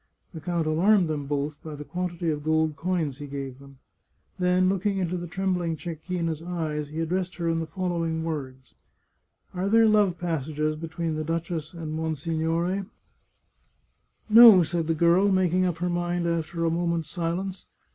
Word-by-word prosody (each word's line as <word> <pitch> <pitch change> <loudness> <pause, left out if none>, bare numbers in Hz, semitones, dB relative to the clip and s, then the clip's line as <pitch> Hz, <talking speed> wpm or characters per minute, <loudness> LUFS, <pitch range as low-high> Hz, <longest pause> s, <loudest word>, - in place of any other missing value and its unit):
The 160 - -8
count 170 +1 -1
alarmed 175 +4 +3
them 145 -3 -3
both 145 +1 -2
by 155 -2 -7
the 145 - -7
quantity 175 0 -3
of 150 -1 -4
gold 160 0 +1
coins 160 -4 -2
he 145 - -6
gave 135 -2 -6
them; 140 -1 -15 0.6
then, 180 0 +3
looking 195 +1 0
into 180 -1 -1
the 175 -1 -4
trembling 180 -2 -1
Cecchina's 165 -1 -4
eyes, 160 -4 -3
he 155 +2 -4
addressed 180 +2 -2
her 170 -2 -3
in 165 0 +1
the 165 - -3
following 165 -2 -2
words: 135 -5 -6 0.4
" - - -44
Are 185 +2 -1
there 225 +1 +5
love 205 -4 +3
passages 155 -2 -2
between 165 +1 -4
the 155 - -2
duchess 165 0 -3
and 160 -2 -5
monsignore? 165 +4 -1 0.5
" - - -41
" - - -41
No," 220 -5 +10
said 165 0 -2
the 165 - +1
girl, 170 +5 +4
making 185 -1 +2
up 175 -2 -2
her 180 +2 -1
mind 175 0 -1
after 165 0 -1
a 165 - +2
mo 170 +1 0
ment's 170 -2 -1
silence. 180 +3 -3
165 Hz, 175 wpm, -26 LUFS, 155-180 Hz, 0.6 s, No